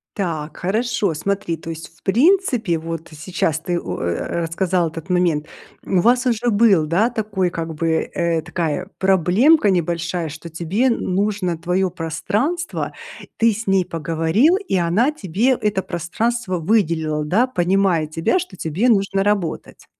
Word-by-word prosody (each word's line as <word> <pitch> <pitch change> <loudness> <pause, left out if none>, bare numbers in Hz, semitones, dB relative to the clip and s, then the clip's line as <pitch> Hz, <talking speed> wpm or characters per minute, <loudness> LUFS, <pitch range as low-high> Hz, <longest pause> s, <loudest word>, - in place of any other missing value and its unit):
Так, 160 -6 -3
хорошо. 215 0 0
Смотри, 170 +1 -2
то 160 - -9
есть, 165 0 -8
в - - -40
принципе, 240 - +2
вот 165 0 -6
сейчас 160 0 -2
ты 175 +1 -2
у, 90 - -5
э, 85 - -2
рассказал 175 +1 0
этот 165 +3 -9
момент, 170 -4 +1 0.4
у 185 - +1
вас 245 +6 +3
уже 240 -1 +1
был, 200 -8 +4
да, 210 +9 +2
такой 200 -5 -1
как 165 -1 -4
бы, 160 +1 0
э, 170 -2 0
такая 170 +1 -3
проблемка 195 - +4
небольшая, 170 -1 -1
что 160 +3 -9
тебе 175 +9 -1
н 235 - +2 0.2
нужно 195 -3 0
твоё 180 +2 0
пространство. 210 - -2 0.4
Ты 230 0 +4
с 220 0 -5
ней 190 -2 +3
поговорил, 165 - +2
и 395 - -3
она 185 - +2
тебе 220 - 0
это 210 -6 0
пространство 185 +4 -2
выделила, 160 -5 +1
да, 200 +11 +2
понимая 185 -6 +1
тебя, 165 - 0
что 365 +1 -7
тебе 180 +10 0
нужно 195 -3 +2
работать. 200 -6 -2
180 Hz, 150 wpm, -20 LUFS, 165-215 Hz, 0.4 s, был